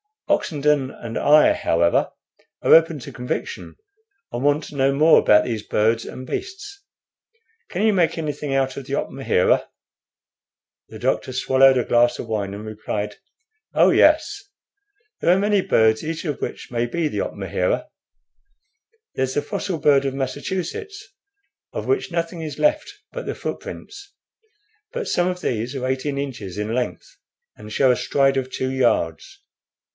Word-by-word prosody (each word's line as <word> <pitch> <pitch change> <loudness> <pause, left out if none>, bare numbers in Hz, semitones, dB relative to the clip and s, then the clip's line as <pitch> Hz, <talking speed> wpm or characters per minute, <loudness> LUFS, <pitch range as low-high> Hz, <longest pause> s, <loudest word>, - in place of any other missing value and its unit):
Oxenden 145 -3 +1
and 115 -3 -8
I, 150 +1 +6
however, 85 +1 +1 0.5
are - - +5
open 165 -2 +5
to 120 - -9
conviction, 125 +2 -5 0.6
and 120 +2 -4
want 145 +2 +2
to 145 - -10
know 135 0 +2
more 155 +3 +6
about 105 0 +5
those 115 -4 -3
birds 110 +2 +1
and 130 - -8
beasts. 395 - -6 0.9
Can 190 +3 -2
you 220 - +4
make 175 -4 +2
anything 150 -3 -3
out 135 -1 0
of 140 - -6
the - - -6
opmahera?" - - +1 1.2
The - - -10
doctor 130 - -1
swallowed 130 +1 +4
a 125 - +2
glass 120 +1 +3
of - - -6
wine, 100 -3 -2
and 105 +1 -8
replied: 105 -1 -4 0.6
"Oh - - +5
yes; 410 0 +3 0.8
there 175 - +4
are - - +1
many 205 0 +2
birds, 110 -8 +3
each 165 +2 -4
of 150 -4 -3
which - - -5
may 120 0 0
be 165 +5 -1
the - - -3
opmahera. - - -2 1.3
There's 130 0 -1
the - - +2
fossil 200 -4 -3
bird 140 -2 +3
of 135 -1 -2
Massachusetts, 190 - -4 0.6
of - - -4
which 400 0 0
nothing 170 0 -3
is 150 -3 -6
left 305 +5 +1 0.2
but - - -6
the - - -3
footprints; 400 0 -7 0.8
but 485 -2 -3
some 175 0 +1
of 180 0 -3
these 120 -2 -2
are 130 -1 -3
eighteen 130 +2 -2
inches 115 -10 -5
in 105 +2 -2
length, 120 -7 -4 0.4
and 105 0 -11
show 130 +3 +3
a - - +3
stride 135 +1 +1
of 130 -1 -2
two 130 0 -3
yards. 135 - 0
140 Hz, 155 wpm, -22 LUFS, 120-170 Hz, 1.3 s, I